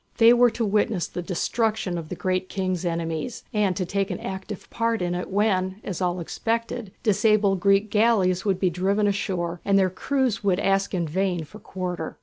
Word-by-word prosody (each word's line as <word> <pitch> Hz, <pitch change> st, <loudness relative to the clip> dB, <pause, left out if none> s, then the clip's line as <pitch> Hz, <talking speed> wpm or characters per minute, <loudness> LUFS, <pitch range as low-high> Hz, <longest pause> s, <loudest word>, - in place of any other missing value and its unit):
They 230 Hz, +1 st, +7 dB
were 245 Hz, 0 st, +5 dB
to 225 Hz, 0 st, -2 dB
witness 210 Hz, -2 st, +1 dB
the 180 Hz, -, -5 dB
destruction 210 Hz, +2 st, -1 dB
of 165 Hz, -2 st, -5 dB
the -, -, -4 dB
Great 185 Hz, +1 st, -1 dB
King's 185 Hz, -2 st, -2 dB
enemies, 165 Hz, +5 st, -3 dB
and 205 Hz, -4 st, +1 dB
to 185 Hz, -, -1 dB
take 195 Hz, +2 st, -1 dB
an -, -, -4 dB
active 190 Hz, +1 st, -6 dB
part 230 Hz, -1 st, 0 dB
in 175 Hz, -1 st, -1 dB
it 180 Hz, 0 st, -4 dB
when, 190 Hz, -1 st, +1 dB
as 190 Hz, -3 st, -5 dB
all 180 Hz, 0 st, 0 dB
expected, 230 Hz, +4 st, -3 dB
disabled 210 Hz, -2 st, +3 dB
Greek 200 Hz, +2 st, +3 dB
galleys 210 Hz, -5 st, +3 dB
would 195 Hz, -3 st, 0 dB
be 185 Hz, -2 st, +2 dB
driven 195 Hz, +4 st, +1 dB
ashore, 180 Hz, -4 st, -1 dB
and 200 Hz, 0 st, +3 dB
their 190 Hz, -2 st, +3 dB
crews 260 Hz, +3 st, -1 dB
would 190 Hz, -2 st, +2 dB
ask 195 Hz, 0 st, +1 dB
in 170 Hz, -2 st, -1 dB
vain 180 Hz, +1 st, -1 dB
for 210 Hz, +8 st, -13 dB
quarter. 180 Hz, -5 st, -5 dB
195 Hz, 190 wpm, -24 LUFS, 180-215 Hz, -, They